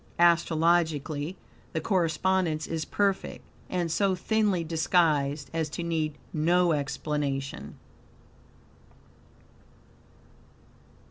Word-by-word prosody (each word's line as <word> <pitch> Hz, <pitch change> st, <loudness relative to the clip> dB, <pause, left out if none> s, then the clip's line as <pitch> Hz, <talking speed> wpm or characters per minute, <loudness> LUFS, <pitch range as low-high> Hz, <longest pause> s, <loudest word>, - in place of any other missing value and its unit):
Astrologically 165 Hz, -2 st, +2 dB, 0.4 s
the 160 Hz, -, 0 dB
correspondence 170 Hz, -1 st, +1 dB
is 160 Hz, -1 st, -3 dB
perfect, 200 Hz, -2 st, -1 dB, 0.3 s
and 175 Hz, -3 st, -1 dB
so 195 Hz, +2 st, +2 dB
thinly 205 Hz, -2 st, +1 dB
disguised 155 Hz, -3 st, +1 dB
as 160 Hz, -2 st, -1 dB
to 170 Hz, -, -5 dB
need 160 Hz, -3 st, -1 dB, 0.2 s
no 175 Hz, +3 st, +3 dB
explanation. 145 Hz, -2 st, -3 dB
165 Hz, 75 wpm, -28 LUFS, 155-180 Hz, 0.4 s, no